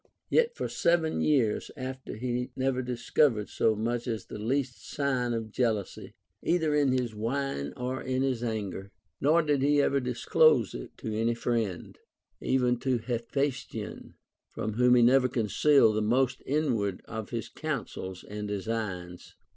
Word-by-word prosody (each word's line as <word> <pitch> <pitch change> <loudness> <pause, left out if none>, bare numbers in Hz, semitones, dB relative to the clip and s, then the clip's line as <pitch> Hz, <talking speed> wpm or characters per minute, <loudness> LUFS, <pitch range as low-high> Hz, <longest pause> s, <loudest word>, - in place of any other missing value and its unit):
Yet 475 0 +3
for - - -2
seven 170 -2 +1
years 130 -8 +2
after 130 0 -6
he 125 +2 -2
never 130 -1 0
discovered 125 -2 +1
so 110 - +2
much 120 +3 -2
as 110 -5 -3
the - - -8
least 125 +3 -1
sign 130 -4 0
of 115 -2 -3
jealousy, 110 -5 -2 0.3
either 160 -3 +1
in 145 -3 +3
his 125 -3 0
wine 115 - -2
or 125 +1 -3
in 130 0 -1
his 130 -3 -1
anger; 100 -4 -3 0.3
nor 160 +4 +4
did 145 -3 +1
he 145 +1 +3
ever 140 0 +3
disclose 125 - +3
it - - -8
to 110 - -5
any 115 +2 +1
friend, 115 -6 -2 0.4
even 125 -2 +1
to 130 0 +1
Hephaes 125 +4 -1
tion, - - -7 0.3
from 110 - -4
Avhom 125 +2 +5
he 120 - +6
never 130 +2 +5
concealed 115 +1 +3
the 110 - +1
most 125 +3 +1
inward 125 -10 0
of 110 -2 -6
his 115 -2 -4
counsels 115 - -5
and 105 0 -6
designs. 100 -4 -4
125 Hz, 155 wpm, -29 LUFS, 110-135 Hz, 0.4 s, he